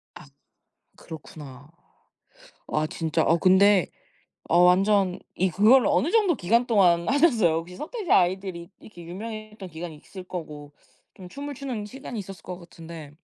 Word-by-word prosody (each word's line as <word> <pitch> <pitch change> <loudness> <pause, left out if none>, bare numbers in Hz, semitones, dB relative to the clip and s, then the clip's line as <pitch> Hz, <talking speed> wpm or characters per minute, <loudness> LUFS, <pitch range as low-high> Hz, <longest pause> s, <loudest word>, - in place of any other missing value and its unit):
아 - - -12 0.7
그렇구나. 145 -3 -11 1.0
와 155 0 -1
진짜 160 0 -1
어 165 +2 +2
근데 190 0 +4 0.6
어 175 - +4
완전 190 +1 +3 0.2
이 185 +1 +1
그거를 225 - +5
어느 295 +3 +1
정도 405 -8 +3
기간 230 +5 +1
동안 180 -6 +3
하셨어요 245 - +3
혹시? 170 +2 -5
서태지 385 +3 -5
아이들이 185 -1 +1
이렇게 175 -5 -13
유명했던 215 +2 -8
기간이 160 -1 -8
있을 185 +5 -12
거고 150 -5 -8 0.4
좀 180 -2 -12
춤을 285 +4 -7
추는 250 -6 -5
시간이 250 0 -8
있었을 195 -3 -9
것 180 0 -8
같은데 165 -3 -11
185 Hz, 310 characters per minute, -25 LUFS, 170-220 Hz, 1.0 s, 그거를